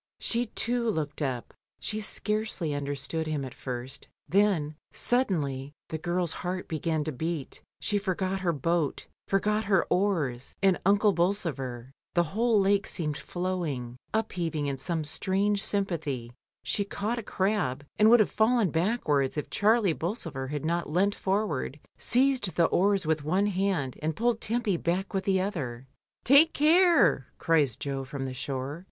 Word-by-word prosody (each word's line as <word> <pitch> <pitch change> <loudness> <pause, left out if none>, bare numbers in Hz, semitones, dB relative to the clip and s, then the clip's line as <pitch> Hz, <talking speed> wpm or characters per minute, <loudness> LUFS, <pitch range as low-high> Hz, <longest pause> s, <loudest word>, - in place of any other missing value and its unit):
She 240 +1 0
too 235 +2 -1
looked 155 -6 -2
up; 130 -4 -3 0.3
she 215 0 -3
scarcely 210 -6 -2
un 145 -1 -3
derstood 145 +3 -2
him 150 -3 -2
at 130 - -8
first, 130 +2 -5 0.2
then, 185 -6 +2 0.2
suddenly, 145 - 0 0.2
the 160 - -3
girl's 175 +1 0
heart 180 +1 -3
began 160 -1 -1
to 155 - -2
beat, 160 +1 -4 0.2
she 205 - 0
forgot 190 -1 -1
her 180 -2 +1
boat, 160 0 -1 0.2
forgot 210 +2 +1
her 195 -3 +3
oars, 160 -11 0
and 190 -2 +4
Uncle 205 +1 +4
Bolsover; 145 - -1 0.2
the 175 - +5
whole 225 0 +3
lake 195 0 +2
seemed 150 -4 -2
flowing, 165 -10 -3 0.2
upheaving 175 -9 -1
in 140 -2 -2
some 170 -3 -2
strange 195 +6 0
sympathy, 155 - -2 0.3
she 130 +10 0
caught 210 +4 -3
a - - -3
crab 185 - -1
and 215 +1 +7
would 235 -1 +7
have 210 - +1
fallen 220 -4 +3
backwards 160 - +1
if 150 - -4
Charles 215 -3 +3
Bolsover 165 - -3
had 145 +1 -4
not 170 0 -1
leant 190 +6 +2
forward, 190 -10 -1 0.2
seized 250 - +2
the 170 - +4
oars 195 +1 +2
with 155 -1 0
one 185 +7 +2
hand, 190 -9 -1
and 155 0 -1
pulled 235 0 +1
Tempy 220 -4 0
back 180 +5 -1
with 195 -1 -1
the 190 -1 +3
other. 135 -11 -4 0.4
"Take 285 +6 +7
care," 330 - +5
cries 150 -8 +2
Jo 135 -1 -3
from 135 +1 -5
the 130 -1 -4
shore. 135 +3 -4
175 Hz, 155 wpm, -28 LUFS, 145-205 Hz, 0.4 s, and